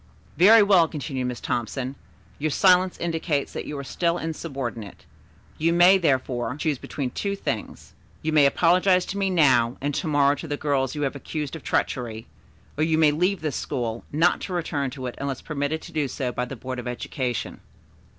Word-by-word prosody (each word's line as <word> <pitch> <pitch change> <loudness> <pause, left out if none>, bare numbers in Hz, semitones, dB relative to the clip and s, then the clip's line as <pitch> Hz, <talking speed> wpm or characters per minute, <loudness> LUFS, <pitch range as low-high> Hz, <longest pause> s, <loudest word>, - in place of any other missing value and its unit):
"Very 210 +5 +7
well," 190 -5 +5
continued 135 -4 -4
Miss 125 -1 -4
Thompson. 125 +3 -3 0.4
"Your 155 +2 0
silence 185 +3 +4
indicates 165 -4 -2
that - - -5
you 150 - -5
are 140 - -5
still 170 +5 0
insubordinate. 135 - -5 0.5
You 165 +2 +2
may, 180 +3 +6
therefore, 130 -6 0
choose 150 -4 -1
between 135 -4 -4
two 200 -1 -2
things. - - -5 0.3
You 155 0 -1
may 145 -2 +6
apologize 180 +4 +3
to 200 - -4
me 195 -1 +1
now, 130 -9 +3
and 145 +1 -2
to 160 - -2
morrow 145 -2 +4
to 145 +3 -7
the 145 -1 -3
girls 140 -3 0
you 150 - -2
have 140 0 -1
accused 150 +1 -5
of 160 - -8
treachery, 115 -5 -2 0.5
or - - +3
you 160 0 +2
may 155 -2 +5
leave 180 +5 0
this 155 -3 -2
school, 115 -2 -3
not 165 +4 +2
to 185 - -5
return 150 -5 -1
to 130 0 -7
it 125 - -4
unless 140 -2 -3
permitted 155 +1 -3
to - - -10
do 150 -3 0
so 130 -1 -3
by 125 +1 -2
the 135 - -7
Board 130 +1 -6
of 125 - -6
Education." 125 0 -4
145 Hz, 190 wpm, -24 LUFS, 130-165 Hz, 0.5 s, Very